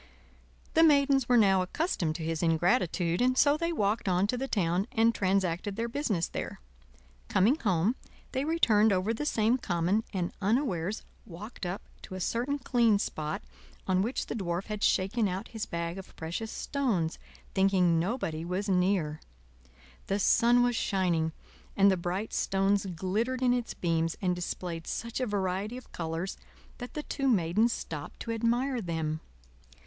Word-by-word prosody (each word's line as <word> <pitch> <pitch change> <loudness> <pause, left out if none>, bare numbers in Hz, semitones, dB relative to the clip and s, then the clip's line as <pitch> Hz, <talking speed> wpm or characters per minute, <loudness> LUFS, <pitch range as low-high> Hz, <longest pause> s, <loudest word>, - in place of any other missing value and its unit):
The 325 - +5
maidens 280 -5 +4
were 245 - +6
now 195 -4 +5
accustomed 180 - -1
to 165 - -5
his 160 0 -2
ingratitude, 170 +1 +1
and 255 +1 +2
so 285 +1 +5
they 335 +2 -1
walked 210 - 0
on 180 +1 +3
to 215 - -1
the 265 +2 -3
town 185 -2 0
and 230 -2 +3
transacted 190 0 0
their 230 +2 -2
business 230 - -1
there. - - -5 0.7
Coming 195 +7 +4
home, 195 - +1 0.4
they 265 - -1
returned 225 -10 +4
over 190 +4 +1
the 295 +6 -3
same 225 +2 +2
common, 180 +3 0
and 180 -3 -2
unawares 205 - 0 0.2
walked 200 +2 -7
up 180 +3 -4 0.2
to 185 - -8
a - - -5
certain 245 +9 -1
clean 235 -5 +3
spot 155 -5 -3 0.4
on 185 -1 +3
which 235 +6 -1
the - - -4
Dwarf 180 -4 -2
had 210 -1 -4
shaken 205 +4 +2
out 190 +3 -4
his 220 -2 -5
bag 170 +2 -3
of 190 - -12
precious 170 +8 -4
stones, 220 - -1 0.3
thinking 185 -4 +3
nobody 170 -4 -2
was 185 +4 -2
near. 180 -5 +1 0.9
The 195 - +1
sun 240 +4 +4
was 245 -1 +1
shining, 175 -6 +1 0.5
and 200 0 +6
the - - +3
bright 180 +4 -3
stones 195 +1 +1
glittered 210 +9 -1
in 245 -1 +4
its 245 -2 -2
beams 165 -1 0
and 180 -2 0
displayed 175 -1 -5
such 235 +2 -3
a 255 - 0
variety 200 +3 -2
of 255 - -12
colors 165 +2 -4 0.4
that 245 0 -8
the 300 - -3
two 275 -2 -2
Maidens 210 +1 +3
stopped 150 -9 -6
to 230 - -4
admire 235 +3 0
them. 160 -4 -2
195 Hz, 165 wpm, -29 LUFS, 175-235 Hz, 0.9 s, were